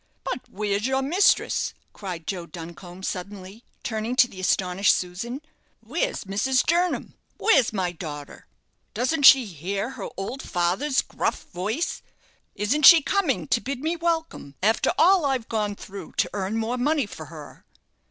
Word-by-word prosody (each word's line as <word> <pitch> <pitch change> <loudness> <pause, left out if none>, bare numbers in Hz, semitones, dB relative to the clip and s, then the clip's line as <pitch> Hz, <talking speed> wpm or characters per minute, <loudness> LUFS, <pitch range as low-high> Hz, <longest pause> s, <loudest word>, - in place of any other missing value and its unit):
But 255 -2 -5
where's 205 +2 -1
your 265 0 0
mistress?" 355 +9 +2 0.2
cried 180 -5 -7
Joe 175 -2 -4
Duncombe, 175 +2 -10
suddenly, 195 +3 -6 0.2
turning 225 +2 -2
to 250 - +6
the 190 - -12
astonished 185 +1 +2
Susan. 230 +10 -5 0.4
"Where's - - -2
Mrs. 245 +7 +1
Jernam? 350 +2 0 0.2
where's 270 - +4
my 185 -4 -1
daughter? 150 -4 -8 0.5
Doesn't 270 +5 +4
she 265 -2 +8
hear 195 - -4
her - - -6
old 220 +8 -4
father's 190 +11 0
gruff - - -2
voice? 215 - -2 0.5
Isn't 260 +9 +4
she 330 -3 +9
coming 280 - 0
to 230 - +2
bid 270 -1 -4
me 320 +3 -1
welcome 325 - -2
after 220 +2 +3
all 370 0 +5
I've 265 -5 0
gone 210 -2 -1
through 200 0 -10
to - - 0
earn 200 +2 -2
more 230 +3 -2
money 290 +1 +1
for 160 -6 -9
her?" 150 -1 -12
215 Hz, 150 wpm, -25 LUFS, 185-270 Hz, 0.5 s, she